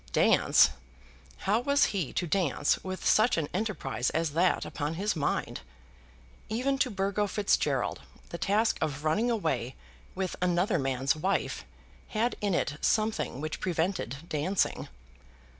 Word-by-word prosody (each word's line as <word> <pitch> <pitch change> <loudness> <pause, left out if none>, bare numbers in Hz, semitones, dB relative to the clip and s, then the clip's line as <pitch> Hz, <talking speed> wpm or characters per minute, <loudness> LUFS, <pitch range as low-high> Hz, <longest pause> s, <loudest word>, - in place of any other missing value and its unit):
Dance! - - +5 0.7
How 210 +4 +3
was 280 +3 +3
he 180 -9 -2
to 180 - -1
dance 165 -5 +1
with 185 0 -5
such 220 0 +4
an 155 -3 0
enterprise 180 - -1
as 165 -1 -1
that 175 +4 +2
upon 150 +2 -3
his 200 +3 -1
mind? 145 -3 -1 0.9
Even 260 +5 0
to 260 - +2
Burgo 200 0 0
Fitzgerald 200 0 0 0.3
the 170 - -6
task 215 +3 +1
of 145 -2 -2
running 185 +10 +1
away 140 - -1 0.4
with 185 -1 -2
another 180 0 +2
man's 135 +1 0
wife 190 +6 -1 0.4
had 230 +3 0
in 200 -3 +1
it 145 -2 -1
something 215 - 0
which 155 0 -4
prevented 165 - -2
dancing. 175 +6 0
185 Hz, 135 wpm, -29 LUFS, 155-210 Hz, 0.9 s, Dance